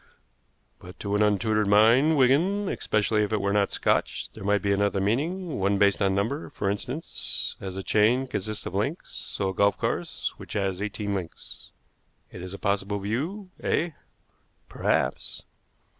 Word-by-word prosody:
"But 90 +1 -12
to 100 -1 -2
an 105 - +2
untutored 105 0 +2
mind, 115 +10 +5
Wigan, 170 +11 +3
especially 105 0 +1
if 105 - -1
it 110 - +1
were 100 0 0
not 100 -1 +2
Scotch, - - 0
there - - -10
might 100 -1 +1
be 100 - +1
another 100 0 +1
meaning, 150 - -1
one 100 +1 +2
based 100 0 +3
on 95 -1 +2
number, 115 +10 -1
for 100 - -1
instance. 125 +10 -2
As 95 -1 -5
a 95 - -4
chain 110 +7 +3
consists 110 -3 -4
of - - -5
links, 135 - -2
so 95 -2 -3
a - - -3
golf 100 +2 +3
course, - - -2
which - - -9
has 95 -2 -1
eighteen 105 0 -3
links. 90 -4 -7 0.6
It - - -9
is 90 0 -7
a - - -8
possible 100 +1 -1
view, 155 - -3
eh?" 170 +2 0 0.8
"Perhaps." - - -1
105 Hz, 165 wpm, -26 LUFS, 100-125 Hz, 0.8 s, mind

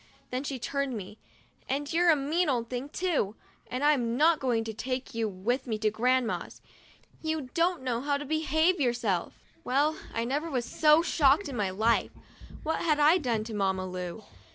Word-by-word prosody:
Then 255 +2 -2
she 275 -2 -3
turned 275 +2 -2
to - - -3
me, 205 +2 -9 0.5
"And 285 +3 -2
you're 345 +1 +4
a 320 - +7
mean 300 +5 0
old 235 -3 -1
thing 255 +3 -4
too! 305 - -1 0.3
and 255 +3 -3
I'm 245 -6 +2
not 315 +2 +4
going 240 -4 0
to 225 0 -5
take 255 +3 -4
you 225 -1 -1
with 240 +8 -2
me 220 -2 -1
to 215 0 +1
Grand 250 +3 +2
ma's. 220 - -4 0.6
You 315 -5 -3
don't 340 -3 +1
know 245 -2 -1
how 285 +1 0
to 290 - -6
behave 315 +4 +2
yourself." 235 -8 0 0.3
Well, 290 +4 +2 0.2
I 230 0 -2
never 290 +6 -2
was 250 -5 -1
so 305 +4 +4
shocked 295 0 +3
in 270 - -6
my 205 -4 0
life. 220 +5 +1 0.5
What 320 +1 -1
had 305 -3 +2
I 310 +5 +6
done 235 -7 -1
to 225 0 -7
Mamma 190 -2 0
Lu? 180 +2 -6
260 Hz, 195 wpm, -29 LUFS, 230-300 Hz, 0.6 s, a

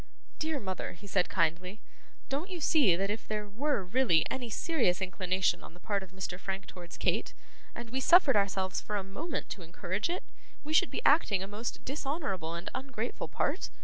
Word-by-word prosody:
'Dear 310 -2 0
mother,' 190 -4 -4
he 180 +4 -14
said 195 -2 +1
kindly, 180 +5 0 0.5
'don't 290 +8 -2
you 360 -2 -4
see 290 - +5
that 195 +3 0
if 220 - -4
there 210 -1 -2
were 240 +2 0
really 180 - +4
any 250 -3 -3
serious 230 - +1
inclination 185 -1 +1
on 165 - -11
the - - -15
part 200 +1 -1
of 190 - -9
Mr. 185 -1 -5
Frank 190 0 -3
towards 175 -1 -9
Kate, - - 0 0.4
and 235 -1 -7
we 260 - 0
suffered 305 0 +6
ourselves 190 -2 +1
for 210 - -4
a 200 - 0
moment 280 - -4
to 195 - -5
encourage 185 - -2
it, 355 - -2 0.4
we 305 +2 -4
should 370 +3 +5
be - - -4
acting 220 - +5
a - - -5
most 210 +4 -5
dishonourable 270 - -2
and 170 +1 -5
ungrateful 260 -3 -4
part? - - -1
205 Hz, 190 wpm, -31 LUFS, 185-270 Hz, 0.5 s, suffered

